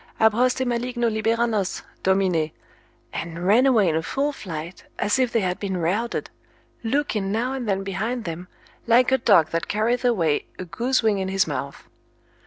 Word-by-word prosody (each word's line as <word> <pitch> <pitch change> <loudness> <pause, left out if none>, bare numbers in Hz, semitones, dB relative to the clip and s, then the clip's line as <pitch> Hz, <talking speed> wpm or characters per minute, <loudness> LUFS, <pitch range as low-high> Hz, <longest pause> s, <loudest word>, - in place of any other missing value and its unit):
Ab 220 -1 +5
hoste 255 +3 +1
maligno 240 -1 -1
libera 225 +2 +1
nos, 210 -5 -2 0.2
Domine, 185 -5 +2 0.6
and 170 +1 -5
ran 230 +8 +5
away 225 -7 +4
in 160 - +1
a 160 - +1
full 275 - -1
flight, 170 - -7
as 210 +6 +1
if 255 -2 +2
they 230 - +2
had 180 -1 -1
been 190 -2 -2
routed, 195 +8 -1 0.5
looking 225 -5 -1
now 240 +5 -1
and 250 -5 -4
then 195 0 0
behind 220 +5 -3
them, 170 +1 -6 0.4
like 245 +3 +5
a 265 - +3
dog 165 -8 +4
that 165 0 -2
carrieth 230 +4 0
away 175 -12 +1
a 185 - -6
goose 240 +10 0
wing 210 -3 +2
in 190 - -2
his 190 0 +2
mouth. 140 -2 -5
215 Hz, 180 wpm, -23 LUFS, 180-240 Hz, 0.6 s, Ab